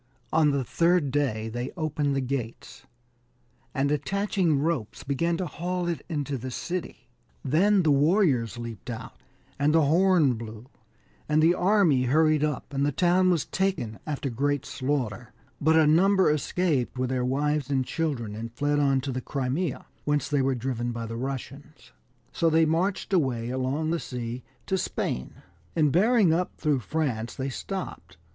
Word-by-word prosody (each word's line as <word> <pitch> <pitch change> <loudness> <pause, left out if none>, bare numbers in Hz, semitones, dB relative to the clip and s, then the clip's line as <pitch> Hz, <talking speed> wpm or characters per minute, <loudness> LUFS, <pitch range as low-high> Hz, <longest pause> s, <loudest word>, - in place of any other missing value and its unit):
On 155 -1 +4
the 140 -2 0
third 170 +2 +2
day 125 -6 0
they 120 +3 -4
opened 150 -3 -1
the 135 - +1
gates, 125 -3 -5 0.8
and 140 0 0
attach 195 +9 -1
ing 170 -7 +3
ropes, 145 -7 -2
began 165 +5 0
to 185 - -2
haul 175 +2 -3
it 165 -5 -3
into 145 -4 -2
the 130 +2 -5
city; 170 -3 -5 0.4
then 185 +8 +3
the 155 - +3
warriors 140 - +2
leaped 115 -2 -7
out, 115 -2 -6 0.5
and 150 +2 +3
the 160 - +5
horn 165 -3 +4
blew, 110 0 -8 0.6
and 150 0 +3
the 165 +2 +5
army 180 -8 +3
hurried 155 +3 +3
up, 150 -1 -2
and 140 0 0
the 145 - +2
town 180 +5 +3
was 170 -6 +1
taken 185 - -2
after 140 -3 -3
great 145 +3 0
slaughter; 125 -5 -3 0.3
but 160 +2 +4
a 160 -1 +6
number 190 +4 +4
escaped 150 -3 0
with 130 0 -1
their 130 -1 0
wives 145 +2 0
and 135 -2 +1
children, 135 -11 -2
and 115 +2 -6
fled 145 +2 +1
on 135 -2 +2
to 135 +1 -3
the 130 0 -3
Crimea, 135 +4 -2 0.2
whence 145 0 0
they 145 -2 +1
were 135 0 +1
driven 120 -1 -2
by 115 -1 -4
the 115 0 -6
Russians, 135 +3 -7 0.4
so 165 - +2
they 160 0 +4
marched 185 +5 0
away 125 -9 +1
along 135 +5 -1
the 170 - 0
sea 120 -2 -5 0.2
to 190 -1 0
Spain, 65 - -3 0.3
and 150 -3 +3
bearing 205 - +4
up 180 +2 -1
through 150 -4 +1
France, 120 -5 -2
they 135 +1 -3
stopped. 185 - -6
145 Hz, 165 wpm, -26 LUFS, 130-165 Hz, 0.8 s, a